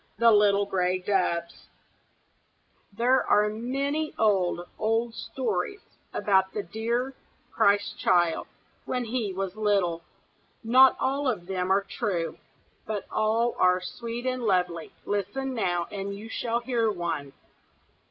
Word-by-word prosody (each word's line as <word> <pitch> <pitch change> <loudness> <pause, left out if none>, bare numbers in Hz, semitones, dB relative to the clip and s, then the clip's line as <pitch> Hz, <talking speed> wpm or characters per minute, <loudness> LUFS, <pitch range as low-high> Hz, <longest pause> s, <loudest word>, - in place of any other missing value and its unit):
THE 230 0 +6
LITTLE 205 -1 +4
GRAY 185 -2 0
DOVES 180 -3 -1 1.2
There 245 +5 +2
are 210 0 +3
many 275 +7 -2
old, 190 -5 +2 0.2
old 225 +2 0
stories 235 - -3 0.3
about 190 -2 +2
the 210 - -2
dear 235 +7 -2 0.4
Christ 205 +1 +2
Child 175 -2 +2 0.4
when 250 -1 -2
he 225 -3 -2
was 190 0 -4
little. 200 -6 +1 0.6
Not 255 +3 +6
all 275 +2 0
of 205 -8 -3
them 185 0 -2
are 200 +1 +3
true, 195 -5 -3 0.5
but 210 -2 -3
all 225 +2 +1
are 180 0 +4
sweet 230 +6 -6
and 255 -1 -1
lovely; 180 -5 0
listen 205 +7 -2
now, 175 -7 0
and 200 0 -4
you 215 +3 -9
shall 235 +1 -1
hear 235 -3 +1
one. 170 -8 -3
210 Hz, 125 wpm, -27 LUFS, 185-235 Hz, 1.2 s, THE